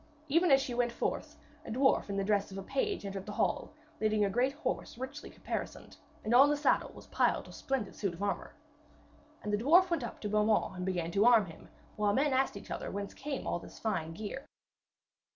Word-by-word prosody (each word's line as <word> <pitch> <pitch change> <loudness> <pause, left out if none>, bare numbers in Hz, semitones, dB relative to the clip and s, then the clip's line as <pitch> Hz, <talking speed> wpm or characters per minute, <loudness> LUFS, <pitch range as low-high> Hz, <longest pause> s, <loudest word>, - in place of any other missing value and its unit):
Even 335 +5 +4
as 270 -1 +7
she 265 -2 -3
went 240 0 +1
forth, - - -3 0.3
a - - -9
dwarf 265 -1 +2
in 200 - -2
the 195 - +1
dress 200 0 +1
of 190 - -7
a 195 - -5
page 275 - -1
entered 195 0 -5
the - - -4
hall - - 0 0.3
leading 215 -1 +2
a 200 - -1
great 250 +5 +2
horse 270 -5 -3
richly 265 +3 -6
caparisoned, - - -6 0.3
and 220 - 0
on 270 +4 +8
the 295 - +2
saddle 290 - +2
was - - -12
piled - - +1
a - - -11
splendid 265 -7 -3
suit 195 -5 -2
of 190 - -6
armour. 200 - -2 0.9
And 210 - -2
the 205 - +2
dwarf 355 +6 +6
went 335 -6 +1
up 235 - -6
to 210 - -2
Beaumains 210 -2 +2
and 180 +1 -3
began 175 -3 -1
to 200 +4 +3
arm 230 -4 +6
him, 165 -3 -13 0.3
while 205 -1 +2
men 280 +4 +2
asked 260 -5 +1
each - - -11
other - - -4
whence 200 0 -5
came 275 -1 -5
all - - -1
this - - -12
fine 175 -7 -2
gear. 220 - -6
220 Hz, 220 wpm, -32 LUFS, 200-270 Hz, 0.9 s, on